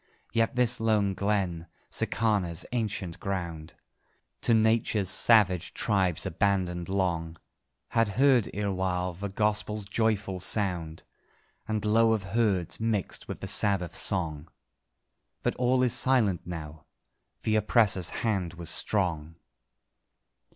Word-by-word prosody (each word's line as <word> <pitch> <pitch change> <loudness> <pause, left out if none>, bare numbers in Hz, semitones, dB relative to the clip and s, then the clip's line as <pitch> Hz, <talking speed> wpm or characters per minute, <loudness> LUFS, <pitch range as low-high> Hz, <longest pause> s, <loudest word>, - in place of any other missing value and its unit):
Yet 115 +1 +1
this 125 -2 +2
lone 105 -3 +1
glen 95 -4 -1 0.2
(Sicāna's 100 -7 0
ancient 105 -7 -3
ground) 85 -5 -5 0.7
To 115 - +3
nature's 110 -3 +2
savage 100 -6 +4
tribes 95 -5 +1
abandoned 90 -3 -1
long, 85 -4 -1 0.5
Had 115 -2 +2
heard, 130 -5 +4
erewhile, 95 -3 -2
the 100 +4 -5
Gospel's 105 +1 -1
joyful 105 -2 -1
sound, 90 -4 -1 0.6
And 110 -1 -2
low 110 +1 +4
of 110 -3 -1
herds 95 -3 0
mixed 110 -3 -2
with - - -7
the - - -5
Sabbath 95 -5 0
song. 80 -2 -2 0.9
But - - +1
all 125 +1 +2
is 125 -2 +3
silent 115 -12 +2
now. 80 -3 -8 0.6
The 110 -1 +2
oppressor's 105 -4 +2
hand 95 -7 -2
was 85 0 -4
strong. 85 -6 -1
100 Hz, 115 wpm, -28 LUFS, 90-110 Hz, 0.9 s, savage